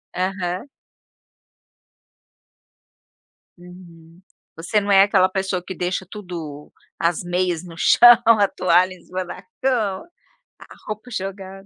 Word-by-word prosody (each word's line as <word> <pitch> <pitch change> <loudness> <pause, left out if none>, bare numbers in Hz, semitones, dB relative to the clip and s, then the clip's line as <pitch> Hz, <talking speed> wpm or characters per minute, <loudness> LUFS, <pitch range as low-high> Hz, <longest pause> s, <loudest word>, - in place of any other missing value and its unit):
Aham. 185 +4 -3 2.9
Uhum, 175 -1 -16 0.3
você 170 +6 0
não 205 0 -2
é 195 0 +7
aquela 185 -2 +3
pessoa 190 -1 -3
que 190 - -7
deixa 180 +2 -3
tudo 165 -7 -8 0.3
as 170 +1 0
meias 175 -1 -1
no 170 -2 -11
chão, 240 +6 +7
a 220 -3 +5
toalha 185 0 +2
em 180 - -16
cima 185 0 -5
na 175 -1 -9 0.2
cama, 225 - -1 0.5
a - - -15
roupa 215 +3 -7
jogada 195 -1 -7
185 Hz, 120 wpm, -21 LUFS, 175-195 Hz, 2.9 s, é